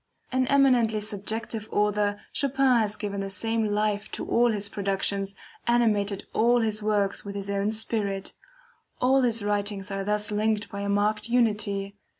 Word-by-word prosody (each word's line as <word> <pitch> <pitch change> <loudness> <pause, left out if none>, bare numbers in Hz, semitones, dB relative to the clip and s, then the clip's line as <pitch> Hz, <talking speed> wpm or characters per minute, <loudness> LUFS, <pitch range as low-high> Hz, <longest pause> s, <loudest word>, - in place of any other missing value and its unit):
An 255 0 +1
eminently 250 -6 +4
subjective 215 +1 -4
author, 205 0 +1
Chopin 270 -3 +3
has 210 -1 0
given 200 -1 -4
the 195 - -4
same 225 +3 0
life 210 0 -1
to - - -3
all 240 0 +3
his 205 -2 -1
productions, 195 0 -1 0.3
animated 210 -4 +1
all 240 +1 +3
his 215 -1 0
works 205 -2 0
with 200 0 -7
his 200 0 -3
own 200 +1 0
spirit. 210 -3 -2 0.7
All 265 +2 +4
his 230 -4 +1
writings 205 -1 -2
are 195 0 -2
thus 210 +1 +2
linked 210 0 0
by 200 - -5
a 200 - -2
marked 210 +2 0
unity. 205 -4 0
210 Hz, 155 wpm, -26 LUFS, 200-225 Hz, 0.7 s, eminently